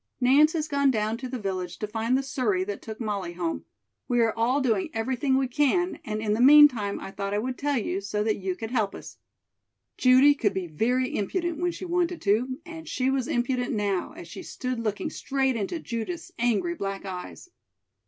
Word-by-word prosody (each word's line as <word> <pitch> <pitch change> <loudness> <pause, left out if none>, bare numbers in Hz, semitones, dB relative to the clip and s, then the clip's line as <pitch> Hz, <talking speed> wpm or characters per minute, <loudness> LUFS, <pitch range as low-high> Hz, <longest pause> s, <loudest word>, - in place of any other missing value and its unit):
Nance 280 +5 +5
has 315 -2 -1
gone 280 -2 +2
down 220 -3 0
to 255 - -5
the 255 - -3
village 185 -4 -4
to - - -3
find 225 +4 0
the 270 - -1
surrey 235 -9 0
that 200 +1 -5
took 220 -1 -8
Molly 200 -6 -3
home. 170 -1 -3 0.4
We 245 -2 +1
are 225 -1 +2
all 240 +5 +2
doing 225 -8 +1
everything 260 +4 +1
we 265 -1 +1
can 300 +7 +1
and 215 0 -3
in 210 -1 +1
the 220 - 0
meantime 260 -7 +6
I - - -7
thought 200 +1 -3
I - - +1
would 250 +4 -2
tell 285 0 0
you 200 -3 -2
so 210 +1 -2
that 215 0 0
you 190 -1 -3
could 225 +4 -6
help 215 -6 0
us." - - -10 0.8
Judy 260 +3 +6
could 205 -8 0
be 190 -1 -2
very 245 +11 0
impudent 340 - -2
when 350 0 +1
she 370 - -7
wanted 350 0 0
to, 240 +6 +1
and 325 -2 -9
she 260 +1 0
was 265 -2 0
impudent 245 0 0
now, 200 -3 -1
as 170 - -10
she - - -8
stood 255 -2 -4
looking 225 +7 -2
straight 270 -3 0
into 230 - -2
Judith's 330 +10 -5
angry 240 +9 +1
black 195 -9 -4
eyes. 190 - -8
240 Hz, 205 wpm, -26 LUFS, 205-275 Hz, 0.8 s, meantime